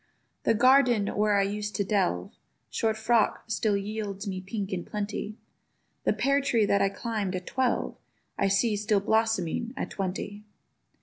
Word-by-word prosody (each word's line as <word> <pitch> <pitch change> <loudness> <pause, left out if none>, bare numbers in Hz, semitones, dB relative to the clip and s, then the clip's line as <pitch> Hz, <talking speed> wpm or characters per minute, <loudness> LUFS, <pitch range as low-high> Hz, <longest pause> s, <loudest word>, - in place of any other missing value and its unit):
The - - +4
garden, 245 -3 +5
where 210 0 +3
I 200 - +4
used 210 +1 -3
to 200 - +1
delve 185 - 0 0.4
Short 220 -1 0
frock'd, 225 0 +1
still 215 -2 +1
yields 200 0 -4
me 190 -2 -3
pinks 195 0 -4
in 175 -2 -2
plenty: 210 +1 -4 0.7
The - - +4
peartree 275 -5 +2
that 200 0 +2
I 195 - +3
climb'd 205 -2 -3
at 180 0 -5
twelve 260 -1 -1 0.4
I 195 - +1
see 210 +3 +2
still 210 0 +1
blossoming, 220 +2 0
at - - -3
twenty. 200 +2 -4
210 Hz, 150 wpm, -28 LUFS, 195-225 Hz, 0.7 s, garden